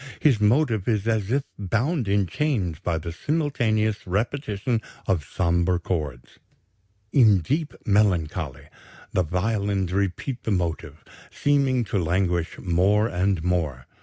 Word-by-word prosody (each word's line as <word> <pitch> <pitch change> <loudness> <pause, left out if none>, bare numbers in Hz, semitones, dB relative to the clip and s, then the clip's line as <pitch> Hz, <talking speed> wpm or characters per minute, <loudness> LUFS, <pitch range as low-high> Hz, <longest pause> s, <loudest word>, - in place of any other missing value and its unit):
His 130 -8 +3
motive 110 -2 +2
is 110 -2 0
as 110 -2 0
if 140 +2 +2 0.2
bound 115 - 0
in 100 0 +2
chains 95 - -1
by 85 -2 -1
the 80 +1 -5
simultaneous 110 - 0
repetition 110 +2 -1 0.2
of 90 -6 +1
sombre 85 +3 +1
chords. 75 -8 -4 0.7
In 110 -7 +6
deep 150 - -2
melancholy 100 -7 0 0.4
the 90 - +3
violins 95 +1 -1
repeat 100 +6 -2
the - - -4
motive, 85 -6 -2 0.3
seeming 135 -3 +2
to 105 -2 -1
languish 85 0 0
more 95 +4 +2
and 95 -4 0
more. 80 -8 -1
100 Hz, 125 wpm, -24 LUFS, 90-115 Hz, 0.7 s, In